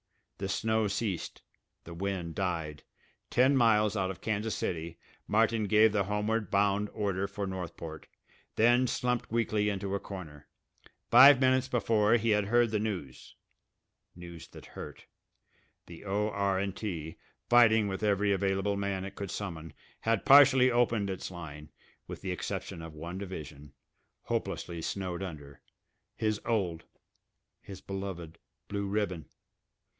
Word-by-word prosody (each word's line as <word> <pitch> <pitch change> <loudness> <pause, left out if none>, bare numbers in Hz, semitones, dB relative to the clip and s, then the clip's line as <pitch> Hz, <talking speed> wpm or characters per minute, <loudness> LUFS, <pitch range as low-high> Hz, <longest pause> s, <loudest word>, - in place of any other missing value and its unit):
The 95 0 -3
snow 110 +2 +1
ceased. 100 -3 -3 0.4
The 85 - -10
wind 90 -2 -3
died. 80 -6 -3 0.5
Ten 130 +3 +4
miles 110 -4 +3
out 95 -2 0
of 95 - -7
Kansas 110 0 -2
City 85 0 -4 0.3
Martin 110 0 +2
gave 110 +1 +5
the 100 -2 +1
homeward 105 0 -1
bound 100 +1 +1
order 100 -2 -2
for 100 0 -4
Northport, 85 -4 -7 0.5
then 120 +3 +4
slumped 125 -1 -1
weakly 110 -2 +1
into 100 -1 -3
a 100 - 0
corner. 80 -9 -9 0.6
Five 130 +3 +9
minutes 130 0 +3
before 115 -4 +2
he 115 -1 +1
had 105 -1 +2
heard 120 +2 +3
the 105 - 0
news 95 -12 -5 0.8
news 85 -1 -10
that - - -13
hurt. - - -10 0.8
The 85 -1 -12
O.R.& 100 -1 0
T., 85 -6 -5 0.3
fighting 110 -3 +5
with 95 +1 -4
every 105 -1 +2
available 95 +1 0
man 100 -1 -2
it 95 - -7
could 100 -2 -6
summon, 85 -6 -6 0.3
had 115 -2 0
partially 135 -2 +7
opened 115 -4 +1
its 95 - -5
line, 75 -4 -9 0.4
with - - -8
the 95 - -2
exception 90 -2 -5
of 80 -1 -9
one 85 +4 -6
division, 75 -7 -8 0.5
hopelessly 85 -1 -3
snowed 90 +1 -4
under 75 -7 -8 0.5
his 110 -1 -1
old, 95 -8 -1 0.8
his 95 - -10
beloved 95 -4 -6 0.3
Blue 100 -1 -3
Ribbon. 100 -6 -2
100 Hz, 135 wpm, -30 LUFS, 90-110 Hz, 0.8 s, Five